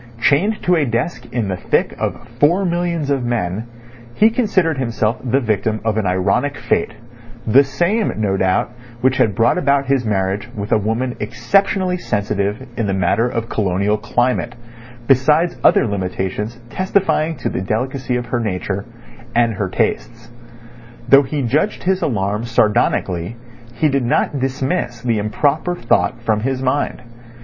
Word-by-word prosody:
Chained 190 - +2
to 180 - +3
a 160 - +2
desk 120 +6 -2
in 120 -4 -1
the 95 -1 -2
thick - - 0
of - - -3
four 175 +7 +3
millions 170 -4 -1
of 135 -3 0
men, 110 -3 -2 0.5
he 220 +1 +5
considered 190 - +1
himself 115 -3 0
the 130 +1 +1
victim 110 -2 -1
of 110 -2 +1
an 110 -2 0
ironic 100 +10 0
fate—the 120 - 0
same, 175 +11 0
no 105 -3 0
doubt, 95 +4 +1 0.3
which 130 0 +2
had 105 -4 +2
brought 115 - +3
about 140 -4 +2
his 135 -1 +1
marriage 100 -1 -1
with 105 +1 -5
a 110 - +5
woman 115 +4 -1
exceptionally 185 - +1
sensitive 105 - -2
in 115 - 0
the 95 - 0
matter 100 +5 +2
of 115 -1 -3
colonial 100 0 0
climate, 120 +2 -1 0.5
besides 150 +7 +3
other - - +5
limitations 100 +2 -3
testifying 185 -4 +1
to - - -4
the - - -2
delicacy 125 +5 -2
of 120 0 -2
her 120 +1 -2
nature—and 115 +3 -3
her 95 -1 -2
tastes. 95 - -2 0.8
Though 140 +2 +8
he 145 +1 -3
judged 150 - 0
his 190 +1 +1
alarm 105 -1 -1
sardonically 105 -4 +1 0.4
he 155 - +2
did 140 -2 +1
not 135 +3 +1
dismiss 130 -2 -2
the 115 -3 +1
improper 145 +11 0
thought 120 -4 +1
from 110 -2 +1
his 130 +3 -1
mind. 130 -1 -1
120 Hz, 150 wpm, -18 LUFS, 105-140 Hz, 0.8 s, Though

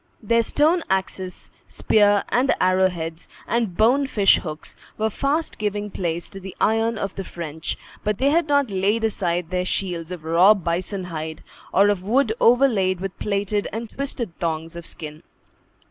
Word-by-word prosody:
Their 230 +2 +3
stone 310 +9 +2
axes, 190 -1 -2 0.2
spear 205 -2 +3
and 260 +3 +2
arrow 185 +1 +3
heads, 165 -1 -6 0.2
and 230 -7 -1
bone 260 +6 +4
fish 205 -6 +4
hooks, 155 -3 -6 0.2
were 220 0 0
fast 290 +8 -1
giving 210 0 -2
place 170 -2 -3
to 195 - -7
the 190 0 -9
iron 225 +1 +2
of 195 -2 -3
the 195 - -5
French; 160 -3 -5 0.3
but 210 -1 0
they 275 +5 +2
had 330 0 +2
not 285 -5 +2
laid 200 +4 +1
aside 180 -5 -1
their 180 0 0
shields 180 -2 -2
of 175 -4 -6
raw 175 +6 +6
bison 185 +2 -2
hide, 160 -2 -6 0.3
or 200 +1 +5
of 205 -3 0
wood 220 +4 +2
overlaid 230 -7 +4
with 195 0 -6
plaited 205 0 -1
and 225 +1 -5
twisted 250 -9 -4
thongs 165 0 -3
of 170 -1 -7
skin. 155 -1 -7
195 Hz, 165 wpm, -23 LUFS, 175-225 Hz, 0.3 s, raw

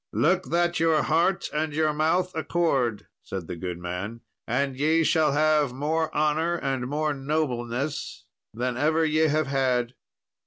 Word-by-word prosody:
"Look 185 +4 +2
that 175 +1 +1
your 160 -2 +3
heart 170 +4 +1
and 155 0 -1
your 155 0 +1
mouth 175 +5 +1
accord," 140 -8 0 0.2
said 95 -3 -6
the 85 - -6
good 90 0 -5
man, 90 +6 -5 0.3
"and 135 +3 0
ye 155 +4 +2
shall 155 -3 +3
have 150 -3 +2
more 155 +4 -1
honour 155 +3 +1
and 135 -5 -2
more 150 +2 -1
nobleness 135 -5 -3 0.3
than 125 +2 -3
ever 160 +4 +2
ye 155 +1 +3
have 155 +1 +1
had." 130 -3 0
150 Hz, 150 wpm, -26 LUFS, 125-160 Hz, 0.3 s, your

